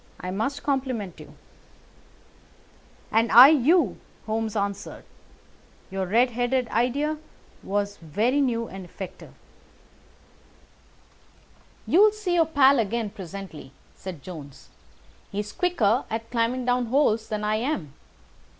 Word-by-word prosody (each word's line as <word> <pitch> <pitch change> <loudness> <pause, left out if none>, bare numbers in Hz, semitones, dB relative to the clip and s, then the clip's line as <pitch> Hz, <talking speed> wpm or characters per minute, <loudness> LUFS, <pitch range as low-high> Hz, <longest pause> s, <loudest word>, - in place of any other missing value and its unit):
I 180 - -5
must 225 +9 -3
compliment 255 - -2
you." - - -13 1.8
"And 230 +1 +2
I 250 +4 +11
you," 305 - +3 0.3
Holmes 220 0 -2
answered. 200 -1 -3 0.9
"Your 190 -1 -2
red 240 +6 +3
headed 245 +1 0
idea 285 +7 0 0.4
was 205 0 -2
very 215 - 0
new 230 -4 0
and 195 0 -9
effective." 180 +1 -10 2.5
"You'll 415 +4 +5
see 420 -4 -3
your 330 -2 +3
pal 280 -3 +5
again 225 0 -1
presently," 190 -7 -9 0.2
said 180 -7 -9
Jones. 150 -7 -10 0.6
"He's 205 +1 -4
quicker 255 - +1
at 225 +1 -5
climbing 240 +1 0
down 245 -1 +1
holes 230 -4 +2
than 210 -1 -3
I 215 +1 +1
am. 220 - -3
230 Hz, 115 wpm, -25 LUFS, 200-265 Hz, 2.5 s, I